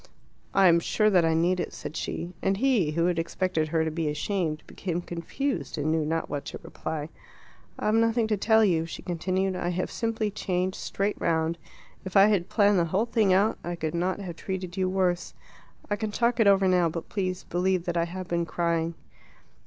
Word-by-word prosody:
"I 195 Hz, -1 st, +6 dB
am 170 Hz, -1 st, +6 dB
sure 215 Hz, +5 st, +2 dB
that 180 Hz, -3 st, +5 dB
I 160 Hz, 0 st, +2 dB
need 175 Hz, +3 st, +2 dB
it," -, -, -3 dB
said -, -, -7 dB
she; 175 Hz, +2 st, -4 dB
and 195 Hz, 0 st, +1 dB
he, 220 Hz, -, +2 dB
who 165 Hz, +2 st, +1 dB
had 175 Hz, -1 st, +1 dB
expected 165 Hz, -1 st, -1 dB
her 160 Hz, 0 st, +1 dB
to 160 Hz, -, -1 dB
be 160 Hz, -1 st, -1 dB
ashamed, 155 Hz, +1 st, -2 dB
became 175 Hz, -3 st, -4 dB
confused, 175 Hz, -, -3 dB
and 150 Hz, +1 st, 0 dB
knew 160 Hz, -1 st, +1 dB
not 160 Hz, +2 st, -1 dB
what 145 Hz, -1 st, -4 dB
to -, -, -7 dB
reply. 155 Hz, -1 st, -5 dB, 0.7 s
"I've 215 Hz, -, 0 dB
nothing 230 Hz, +1 st, +3 dB
to 215 Hz, -, +3 dB
tell 220 Hz, +2 st, +4 dB
you," 165 Hz, -4 st, +1 dB
she -, -, -8 dB
continued. 185 Hz, +2 st, -1 dB
"I 175 Hz, -1 st, -2 dB
have 180 Hz, +1 st, -2 dB
simply 225 Hz, -2 st, -1 dB
changed 185 Hz, -2 st, -2 dB
straight 200 Hz, +1 st, -2 dB
round. 165 Hz, 0 st, 0 dB, 0.4 s
If 190 Hz, 0 st, -1 dB
I 195 Hz, -, +9 dB
had 195 Hz, -4 st, +1 dB
planned 205 Hz, -3 st, +4 dB
the 170 Hz, -, +2 dB
whole 190 Hz, +7 st, +1 dB
thing 220 Hz, -4 st, +2 dB
out, 200 Hz, +4 st, +3 dB
I 175 Hz, 0 st, -3 dB
could 160 Hz, -2 st, -3 dB
not 180 Hz, +3 st, -1 dB
have 175 Hz, -4 st, -6 dB
treated 185 Hz, -2 st, -5 dB
you 185 Hz, -1 st, 0 dB
worse. 185 Hz, -2 st, 0 dB, 0.5 s
I 205 Hz, -, 0 dB
can 215 Hz, +1 st, -3 dB
talk 235 Hz, +3 st, +1 dB
it 220 Hz, -, +5 dB
over 195 Hz, -1 st, +5 dB
now; 180 Hz, -2 st, +3 dB
but 165 Hz, +1 st, -6 dB
please 185 Hz, -2 st, -2 dB
believe 180 Hz, 0 st, 0 dB
that 175 Hz, -, -2 dB
I 170 Hz, 0 st, +2 dB
have 185 Hz, +1 st, -6 dB
been 170 Hz, -1 st, -1 dB
crying." 170 Hz, -1 st, -1 dB
180 Hz, 205 wpm, -27 LUFS, 170-200 Hz, 0.7 s, I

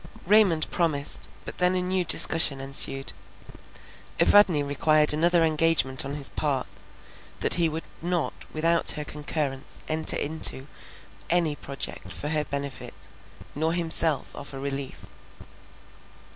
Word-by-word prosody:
Raymond 190 Hz, -5 st, +4 dB
promised; 150 Hz, -5 st, -2 dB, 0.2 s
but -, -, -8 dB
then 180 Hz, 0 st, +2 dB
a 180 Hz, -, 0 dB
new 185 Hz, 0 st, 0 dB
discussion 160 Hz, -4 st, +3 dB
ensued. 135 Hz, 0 st, -3 dB, 1.1 s
Evadne 185 Hz, -8 st, +5 dB
required 150 Hz, +2 st, +3 dB
another 170 Hz, +2 st, +3 dB
engagement 155 Hz, -3 st, +2 dB
on 140 Hz, +1 st, -5 dB
his 140 Hz, -2 st, -4 dB
part, 140 Hz, -4 st, -1 dB, 0.8 s
that -, -, +2 dB
he 170 Hz, -2 st, +3 dB
would 160 Hz, +1 st, -5 dB, 0.2 s
not 175 Hz, -1 st, -1 dB, 0.2 s
without 165 Hz, +2 st, +4 dB
her 150 Hz, -, -3 dB
concurrence 145 Hz, -2 st, -4 dB
enter 155 Hz, 0 st, +1 dB
into 145 Hz, -3 st, -2 dB, 0.6 s
any 170 Hz, -3 st, +1 dB
project 140 Hz, -1 st, -6 dB
for 150 Hz, -, -5 dB
her 155 Hz, -1 st, 0 dB
benefit, 140 Hz, -1 st, -6 dB, 0.6 s
nor 160 Hz, +3 st, -1 dB
himself 165 Hz, -3 st, +2 dB
offer 140 Hz, -1 st, -8 dB
relief. 140 Hz, -1 st, -5 dB
155 Hz, 120 wpm, -26 LUFS, 140-165 Hz, 1.1 s, Evadne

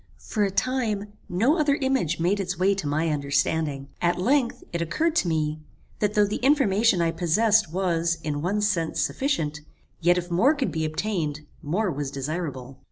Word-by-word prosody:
For 210 Hz, -, -2 dB
a 200 Hz, -, +2 dB
time, 210 Hz, -2 st, -1 dB, 0.2 s
no 235 Hz, -, +2 dB
other 290 Hz, -2 st, +3 dB
image 265 Hz, -, 0 dB
made 180 Hz, +5 st, +1 dB
its 185 Hz, -2 st, -3 dB
way 190 Hz, +3 st, +3 dB
to 195 Hz, -6 st, -4 dB
my 155 Hz, +3 st, 0 dB
understanding. 145 Hz, 0 st, 0 dB
At 175 Hz, 0 st, +2 dB
length, 255 Hz, +5 st, +1 dB
it 170 Hz, -, -1 dB
occurred 315 Hz, -, 0 dB
to -, -, +2 dB
me, 155 Hz, -2 st, -1 dB, 0.4 s
that 210 Hz, +1 st, 0 dB
though 210 Hz, -1 st, +5 dB
the 205 Hz, -, -2 dB
information 230 Hz, -, +3 dB
I 165 Hz, -, +1 dB
possessed 205 Hz, +3 st, +2 dB
was, 170 Hz, -2 st, 0 dB
in 145 Hz, -2 st, -2 dB
one 200 Hz, +6 st, 0 dB
sense, 185 Hz, -6 st, 0 dB
sufficient, 160 Hz, -, -1 dB, 0.4 s
yet 175 Hz, +1 st, +3 dB
if 175 Hz, 0 st, -4 dB
more 240 Hz, -, +4 dB
could 275 Hz, -3 st, -1 dB
be 160 Hz, -1 st, -1 dB
obtained, 155 Hz, -3 st, -2 dB, 0.2 s
more 185 Hz, +6 st, -1 dB
was 145 Hz, -2 st, -3 dB
desirable. 135 Hz, -2 st, -5 dB
180 Hz, 175 wpm, -25 LUFS, 155-215 Hz, 0.4 s, though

